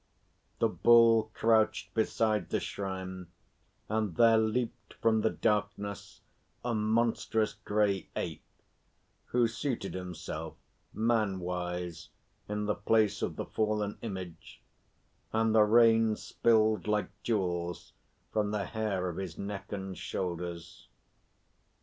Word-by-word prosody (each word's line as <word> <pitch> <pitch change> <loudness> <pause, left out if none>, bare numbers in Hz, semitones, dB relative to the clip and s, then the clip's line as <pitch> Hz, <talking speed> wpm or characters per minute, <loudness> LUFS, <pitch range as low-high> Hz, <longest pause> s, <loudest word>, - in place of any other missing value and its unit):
The - - +3
Bull 115 -2 +5
crouched 110 -1 +2
beside 110 -3 +1
the - - 0
shrine, 95 -2 -5 0.6
and 110 -5 -1
there 115 -1 +6
leaped 110 0 -2
from 110 -1 +2
the 110 - +3
darkness 105 -1 -2 0.4
a 120 - 0
monstrous 110 0 +1
grey 105 -2 0
Ape, - - -3 0.8
who 120 -1 +2
seated 115 -2 -3
himself 90 -3 -6 0.4
man 110 -4 +1
wise 90 -2 -4 0.4
in 105 0 -2
the 105 - +1
place 105 0 +2
of - - -2
the - - -4
fallen 105 -1 -1
image, 95 -6 -7 0.7
and 110 0 +2
the 110 - +6
rain 115 0 +5
spilled 110 -1 +2
like 105 0 +1
jewels 90 -6 -2 0.4
from 105 -1 +1
the 105 -2 -1
hair 100 -3 -2
of 85 - -4
his 95 -4 -5
neck 100 -1 -6
and 95 -2 -4
shoulders. 85 -2 -5
105 Hz, 115 wpm, -31 LUFS, 95-110 Hz, 0.8 s, there